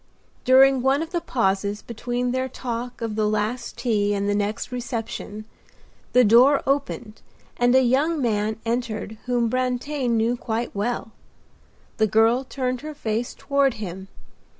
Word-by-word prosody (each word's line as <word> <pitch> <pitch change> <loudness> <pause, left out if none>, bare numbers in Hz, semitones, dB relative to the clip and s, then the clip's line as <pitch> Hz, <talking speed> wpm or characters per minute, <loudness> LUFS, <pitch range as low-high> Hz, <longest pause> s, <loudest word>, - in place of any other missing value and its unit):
During 265 0 +6
one 270 +4 +2
of 330 - -9
the 345 -2 -1
pauses 200 -4 -1
between 245 +2 -3
their 260 +1 -1
talk 245 -1 -5
of 220 -2 -3
the 215 -1 +1
last 215 +3 -2
tea 205 -4 +1
and 200 0 -1
the 205 - +1
next 210 +4 -2
reception 225 -3 -5 0.7
the 250 - +6
door 245 +6 +6
opened 270 -5 -2 0.4
and 245 +1 +3
a 260 - +6
young 285 +6 +2
man 215 -3 0
entered 225 -2 -3
whom 240 -2 +1
Brantain 255 +1 -1
knew 230 +2 +1
quite 235 0 -3
well. 225 +2 -2 0.9
The 220 - +3
girl 225 +5 +3
turned 255 -2 -3
her 305 0 -7
face 230 -3 -3
toward 280 -3 +1
him. 190 -3 -7
240 Hz, 150 wpm, -23 LUFS, 215-260 Hz, 0.9 s, During